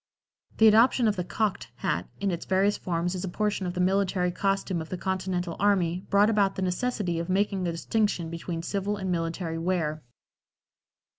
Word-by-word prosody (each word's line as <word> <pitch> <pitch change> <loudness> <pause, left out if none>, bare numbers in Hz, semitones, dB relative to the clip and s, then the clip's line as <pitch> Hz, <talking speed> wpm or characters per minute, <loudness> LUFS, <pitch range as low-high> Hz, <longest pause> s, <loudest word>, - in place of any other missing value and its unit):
The 220 - +7
adoption 230 +2 +5
of 210 - +2
the 180 - -2
"cocked" 205 +3 -2
hat - - -2
in 200 -1 0
its 170 - -4
various 195 +2 +3
forms 175 0 -2
as 185 0 -4
a 190 - -3
portion 205 0 -1
of 175 - -4
the - - -3
military 185 -1 +1
costume 195 -2 -1
of 160 - -8
the 185 - -4
Continental 185 -2 -2
Army 185 -3 +1
brought 200 +1 +5
about 205 -3 +2
the 190 - -2
necessity 185 -2 -1
of 170 +2 -4
making 195 -1 +1
a - - 0
distinction 170 -1 -1
between 165 0 -5
civil 200 +3 -2
and 190 -2 -3
military 165 -1 -2
wear. 165 -3 -1
185 Hz, 180 wpm, -27 LUFS, 175-200 Hz, -, The